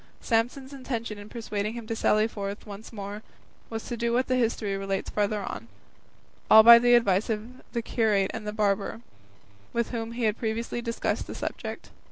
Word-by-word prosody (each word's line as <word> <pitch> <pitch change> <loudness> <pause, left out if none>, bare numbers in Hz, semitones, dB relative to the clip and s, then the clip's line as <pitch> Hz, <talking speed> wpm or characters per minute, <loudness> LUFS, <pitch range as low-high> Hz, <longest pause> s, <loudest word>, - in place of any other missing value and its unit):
Samson's 250 +4 -1
intention 230 -5 -4
in 205 +1 -10
persuading 215 -2 -3
him 235 -2 -6
to 225 - -3
sally 215 0 +3
forth 200 -2 -6
once 205 +1 -9
more 205 -1 -6 0.5
was 225 -1 -5
to 240 - -4
do 235 0 -1
what 250 +2 +2
the 255 - +1
history 225 -4 0
relates 195 0 -3
farther 205 0 0
on; 115 - -6 0.8
all 220 0 +10
by 235 +1 +11
the 245 0 +5
advice 200 -3 +2
of 225 +4 -4
the 235 -2 -1
curate 210 -5 +1
and 215 -1 -5
barber, 205 +1 0 0.7
with 235 -1 -1
whom 230 -1 -4
he 240 0 -3
had 215 -1 +1
previously 230 +1 -2
discussed 230 -1 -2
the - - -7
subject. - - -6
225 Hz, 180 wpm, -27 LUFS, 205-235 Hz, 0.8 s, by